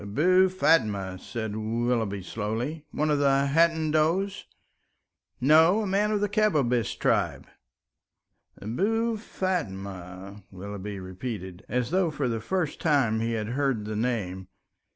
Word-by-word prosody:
"Abou 180 - +3
Fatma," 105 - +1
said 110 0 -5
Willoughby, 110 -2 -1
slowly, 115 - -4
"one 150 +1 0
of 145 - +2
the 140 -1 +3
Hadendoas?" 165 +3 +2 0.9
"No, 160 - +5
a - - -2
man 200 +2 +1
of 210 -1 0
the 205 - +2
Kabbabish 150 - +1
tribe." - - 0 1.1
"Abou 220 - 0
Fatma?" 100 - -5
Willoughby 100 +1 -7
repeated, 95 -1 -6
as 125 +2 -1
though 185 -1 +2
for 145 -3 -2
the 115 -2 -2
first 180 - -2
time 135 -9 +2
he 115 +1 -1
had 110 -1 -2
heard 130 -4 0
the 105 0 -4
name. 105 -5 -2
125 Hz, 125 wpm, -27 LUFS, 105-165 Hz, 1.1 s, No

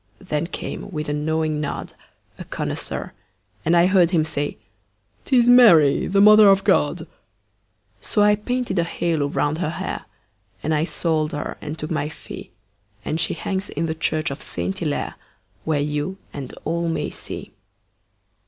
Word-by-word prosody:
Then 165 -3 -3
came, 190 - -6
with 150 -5 -4
a - - 0
knowing 155 0 -1
nod, 145 - -4 0.5
A - - -5
connoisseur, - - -4 0.5
and 170 +2 +3
I 170 - +6
heard 185 -2 +4
him 165 -4 +2
say; 145 -2 -3 0.7
"'Tis 245 -3 +4
Mary, 205 - +6
the 195 +2 +2
Mother 210 0 +8
of 195 0 +4
God." - - +2 0.9
So 210 - +1
I 210 0 +6
painted 235 -2 -2
a - - +3
halo 165 -3 -1
round 145 +2 -1
her 175 - -1
hair, 160 - -4 0.6
And 160 - 0
I 155 +1 +1
sold 160 -3 -1
her 145 - -4
and 150 +1 -5
took 155 +1 -5
my 150 -1 -1
fee, - - -10 0.6
And 160 +2 -1
she - - 0
hangs 195 0 -3
in 160 +3 -2
the 160 - -1
church 155 -1 -1
of 140 - -6
Saint 190 0 -4
Hillaire, 155 -4 -2 0.5
Where 155 -2 +1
you 150 +6 -2 0.2
and 135 -3 -6
all 170 +2 -1
may 165 - -2
see. - - -8
160 Hz, 160 wpm, -22 LUFS, 150-190 Hz, 0.9 s, Mother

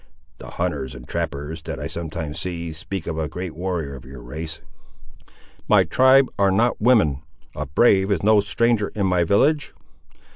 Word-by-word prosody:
The - - -9
hunters 75 -8 -2
and - - -11
trappers, 75 +3 -4
that 80 - -6
I - - -5
sometimes 80 -2 -5
see, 85 -3 -4
speak 85 +2 -6
of 80 -1 -3
a 80 - -1
great 90 +1 -6
warrior 85 -5 -3
of 65 - -11
your 65 -1 -11
race." 80 +6 -6 1.1
"My - - +5
tribe 130 +1 +5
are 100 -1 +4
not 110 +5 +1
women. 105 - +3 0.3
A 75 - -4
brave 95 - +3
is 100 - 0
no 110 0 +5
stranger 105 +1 +1
in 100 -2 0
my 90 -2 +2
village." 140 - +2
85 Hz, 170 wpm, -22 LUFS, 75-100 Hz, 1.1 s, My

